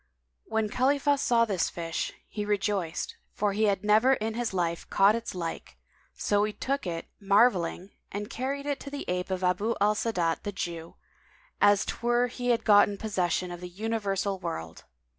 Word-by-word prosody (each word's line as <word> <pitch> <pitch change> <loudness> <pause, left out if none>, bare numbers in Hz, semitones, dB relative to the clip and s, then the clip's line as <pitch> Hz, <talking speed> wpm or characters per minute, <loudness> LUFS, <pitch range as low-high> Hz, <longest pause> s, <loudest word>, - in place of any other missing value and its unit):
When 220 -1 0
Khalifah 280 +5 +2
saw 235 -2 +3
this 195 -6 0
fish, 165 -1 -3 0.2
he 210 - -4
rejoiced, 200 -4 -1 0.2
for 205 -1 0
he 215 +2 +2
had 200 -2 +1
never 215 +5 +5
in 220 -2 -3
his 240 0 -2
life 170 -3 -2
caught 200 +2 +5
its 230 -3 -4
like, 170 -2 -5 0.4
so 205 0 +1
he 210 0 -1
took 275 -3 -2
it, 165 -1 -3
marvelling, 195 -3 +2 0.2
and 205 +1 -4
carried 275 +5 -3
it 285 -1 -1
to 280 - -8
the 285 0 -6
ape 180 +1 -2
of 185 0 -2
Abu 190 +6 +1
al 205 +1 +4
Sa'adat 180 -7 0
the 205 - -4
Jew, 170 -3 -5 0.7
as 205 0 +5
'twere 240 +1 +1
he 245 +1 -5
had 235 -1 +2
gotten 205 -1 +5
possession 185 -3 -1
of 175 0 -7
the 180 - -6
universal 200 -1 -2
world. 85 - -6
205 Hz, 175 wpm, -28 LUFS, 180-230 Hz, 0.7 s, never